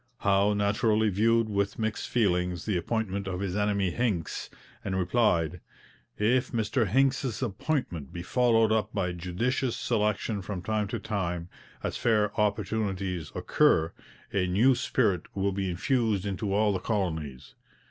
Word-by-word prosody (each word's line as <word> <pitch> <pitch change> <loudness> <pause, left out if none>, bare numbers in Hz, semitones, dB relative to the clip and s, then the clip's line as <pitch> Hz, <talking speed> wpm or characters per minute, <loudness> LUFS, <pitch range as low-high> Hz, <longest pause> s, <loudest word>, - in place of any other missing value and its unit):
Howe 100 +1 +3
naturally 105 +2 +2
viewed 115 +3 +3
with 100 -1 -1
mixed 110 -1 -2
feelings 90 -6 +1
the 105 - 0
appointment 100 +1 -2
of 90 -1 -3
his 95 -2 -2
enemy 100 -3 +1
Hincks, 105 -9 -2 0.3
and 95 -1 -2
replied: 90 -4 +1 0.6
'If 120 +4 +2
Mr 115 0 0
Hincks's 130 0 +1
appointment 105 - -2
be 85 - -6
followed 115 +1 +3
up 110 -1 +1
by 90 -3 0
judicious 110 +9 -1
selection 105 -2 0
from 95 -1 -5
time 105 +1 0
to - - -3
time, 90 -5 -3 0.3
as - - -2
fair 105 -3 +2
opportunities 100 - -1
occur, 80 +1 +2 0.4
a 90 -2 +1
new 110 +9 +4
spirit 110 -7 0
will 100 0 +1
be 95 -1 -2
infused 105 +2 0
into 100 +1 -2
all 105 +1 +3
the 95 - -1
colonies. 80 - -3
100 Hz, 140 wpm, -28 LUFS, 90-110 Hz, 0.6 s, new